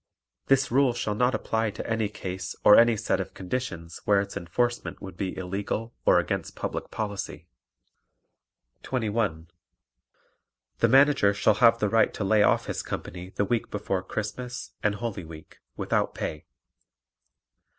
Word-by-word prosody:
This 135 -2 +3
rule 130 0 +4
shall 120 -3 -1
not 125 +4 +2
apply 110 0 0
to 105 - -6
any 115 -2 0
case 95 -2 -5
or 105 - +9
any 115 -1 +6
set - - 0
of - - -5
conditions 90 -5 -5
where 100 -1 +4
its 100 0 -4
enforcement 120 +8 -2
would 95 - -9
be 95 0 -4
illegal 100 +5 -3
or - - +7
against - - -2
public - - -4
policy. 100 -6 -5 1.3
21. 105 -9 -1 1.3
The - - +4
Manager 135 -7 +5
shall 105 +1 +4
have 115 -1 +7
the 105 - +1
right 115 +2 +3
to - - -3
lay 105 +2 +3
off - - +3
his - - -3
company 90 +1 -6
the 100 - -1
week 115 +2 -1
before 100 -2 -2
Christmas 115 +6 -5
and 105 -1 +1
Holy 105 -4 -4
Week 80 -1 -12 0.2
without - - 0
pay. 75 - -4
105 Hz, 150 wpm, -27 LUFS, 95-115 Hz, 1.3 s, or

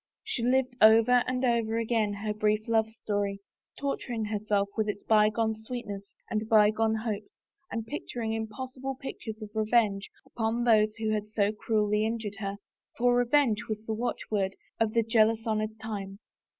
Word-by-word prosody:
She - - -3
lived 255 +1 +2
over 225 +3 +7
and 255 0 0
over 230 -2 +1
again 225 -2 +1
her 210 - 0
brief 215 0 0
love 220 -1 +2
story, 205 -2 -2 0.4
torturing 245 -5 -2
herself 210 -1 0
with 215 -1 0
its 205 0 -4
bygone 220 +1 +3
sweetness 215 -3 -7
and 215 0 -2
bygone 220 +1 +4
hopes 215 -2 -4 0.4
and 225 -1 -3
painting 235 -4 -4
impossible 255 +5 -5
pictures 235 -5 -7
of 210 - -9
revenge 215 -2 +2 0.2
upon 230 +1 -1
those 215 -2 +4
who 220 -1 -1
had 210 -1 -1
so 210 -1 +1
cruelly 210 -1 +1
injured 220 -2 -3
her, 200 -1 -3 0.4
for 245 +1 +3
revenge 245 -2 +2
was 215 0 -4
the 220 - -2
watchword 210 -4 -2 0.2
of 220 -1 +1
the 230 - +4
jealous 225 0 +3
honored 215 0 -1
times. 200 -3 -6
220 Hz, 155 wpm, -29 LUFS, 210-230 Hz, 0.4 s, over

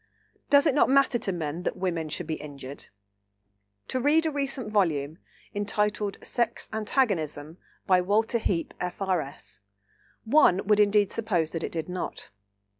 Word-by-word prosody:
Does 285 +1 +6
it 300 - +3
not 285 - +4
matter 270 -2 +4
to 210 -4 -2
men 165 -1 -3
that - - -3
women 170 -4 -2
should 165 +3 -4
be 160 - -3
injured? 140 -2 -9 1.0
To 260 - -1
read 300 +5 +3
a 320 - +1
recent 275 -6 -3
volume, 160 -7 0 0.3
entitled 205 0 -1
Sex 235 -1 -1
Antagonism, 180 - -1 0.3
by 185 -1 +4
Walter 220 +5 +1
Heape, 175 -6 -1
F.R.S., 175 - -3 0.6
one 220 -7 +4
would 210 0 +3
indeed 205 -1 +4
suppose 180 -8 0
that 165 -1 -4
it - - -3
did 160 -2 -4
not. 180 0 -5
195 Hz, 145 wpm, -27 LUFS, 165-225 Hz, 1.0 s, Does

